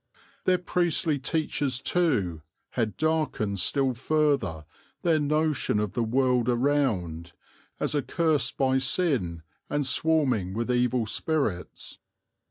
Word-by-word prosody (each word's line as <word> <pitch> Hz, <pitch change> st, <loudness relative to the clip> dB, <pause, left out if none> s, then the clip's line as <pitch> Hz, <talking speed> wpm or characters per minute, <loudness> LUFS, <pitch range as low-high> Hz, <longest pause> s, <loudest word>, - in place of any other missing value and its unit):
Their 185 Hz, 0 st, +4 dB
priestly 175 Hz, -4 st, +1 dB
teachers, 140 Hz, -2 st, -1 dB
too, 115 Hz, -, 0 dB, 0.3 s
had 110 Hz, -6 st, -2 dB
darkened 155 Hz, -11 st, 0 dB
still 135 Hz, +5 st, +1 dB
further 130 Hz, -, 0 dB, 0.4 s
their 165 Hz, -3 st, +3 dB
notion 150 Hz, -6 st, +1 dB
of 105 Hz, -2 st, -2 dB
the 120 Hz, -, -1 dB
world 125 Hz, +1 st, +2 dB
around, 115 Hz, -, 0 dB, 0.5 s
as -, -, 0 dB
accursed 155 Hz, +1 st, 0 dB
by 130 Hz, -1 st, +2 dB
sin 130 Hz, -, 0 dB, 0.3 s
and 145 Hz, -1 st, 0 dB
swarming 130 Hz, -, +1 dB
with 115 Hz, +2 st, -1 dB
evil 125 Hz, -1 st, +1 dB
spirits. 110 Hz, -, -2 dB
130 Hz, 110 wpm, -27 LUFS, 110-155 Hz, 0.5 s, Their